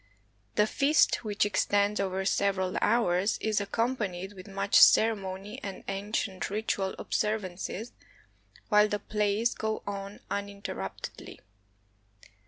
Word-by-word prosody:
The 210 - +4
feast, 280 +7 +3
which 210 -2 +1
extends 205 0 +1
over 190 -1 -1
several 190 -2 +1
hours, 205 -4 +2
is 215 -1 0
accompanied 205 -4 -2
with 185 -2 -11
much 195 0 +3
ceremony 205 0 +4
and 195 -5 -7
ancient 195 -1 -2
ritual 200 -2 -1
observances, 210 +1 -2 0.8
while 210 -1 +6
the 205 - -1
plays 210 +2 0
go 220 0 -3
on 200 0 -6
uninterruptedly. 200 - -6
200 Hz, 105 wpm, -29 LUFS, 195-215 Hz, 0.8 s, while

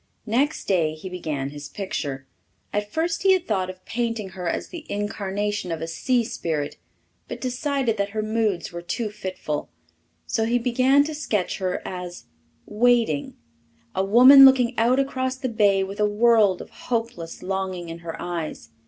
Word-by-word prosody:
Next 260 +7 0
day 165 -5 +1
he 170 +4 -8
began 150 -6 -4
his 145 -1 -8
picture. 145 -9 -4 0.5
At 205 0 -2
first 330 +4 -1
he 385 0 +5
had 365 -2 0
thought 185 -1 0
of 185 0 -10
painting 230 -4 -2
her 180 -2 -4
as - - -3
the 340 -3 -8
incarnation 205 -2 -2
of 165 - -2
a 165 - -3
sea 240 +9 +1
spirit, 155 -8 -3 0.5
but - - -6
decided 255 -2 -1
that 200 0 0
her 215 +1 -3
moods 215 -5 -1
were 170 0 -6
too 215 +5 -3
fitful. 185 -7 -4 0.6
So 220 - 0
he 235 +2 +2
began 255 +4 +3
to 310 +2 -4
sketch 215 -11 -2
her 185 -1 -2
as 180 -1 -7 0.4
"Waiting" 225 -9 +1 0.6
a 190 - 0
woman 250 +7 +9
looking 260 -2 +6
out 245 +3 +3
across 260 -1 -1
the 260 0 -3
bay 205 -4 +3
with 195 +2 -7
a 210 0 +3
world 210 -3 +4
of - - -17 0.2
hopeless 230 -8 -3
longing 185 -2 -3
in 165 0 -7
her 170 -1 -7
eyes. 170 -3 -5
210 Hz, 170 wpm, -24 LUFS, 180-245 Hz, 0.6 s, woman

